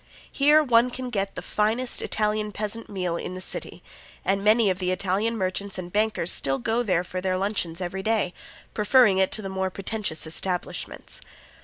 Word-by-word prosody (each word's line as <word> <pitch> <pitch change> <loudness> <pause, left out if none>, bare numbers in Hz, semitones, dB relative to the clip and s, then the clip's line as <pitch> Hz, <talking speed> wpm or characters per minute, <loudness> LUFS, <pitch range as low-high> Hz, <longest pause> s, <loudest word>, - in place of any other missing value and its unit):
Here 295 +2 +5
one 240 -2 +4
can 250 0 -4
get 195 -3 -2
the - - -6
finest 225 +4 0
Italian 210 0 0
peasant 215 +2 -3
meal 180 -4 -2
in 185 - -5
the - - -5
city, 185 - -5 0.4
and 195 +1 +1
many 215 -1 +5
of 185 - -3
the 180 -1 -1
Italian 200 +5 0
merchants 190 0 -2
and 180 -1 -6
bankers 210 -4 +1
still 135 0 +1
go 225 - 0
there 185 -7 +1
for 185 +1 -5
their 185 0 0
luncheons 185 -4 -2
every 185 +2 -3
day, 215 -3 0 0.4
preferring 210 -2 +5
it 190 - +3
to 215 - +1
the - - -3
more 190 0 -1
pretentious 195 -3 -3
establishments. 180 +3 -3
200 Hz, 180 wpm, -25 LUFS, 185-220 Hz, 0.4 s, Here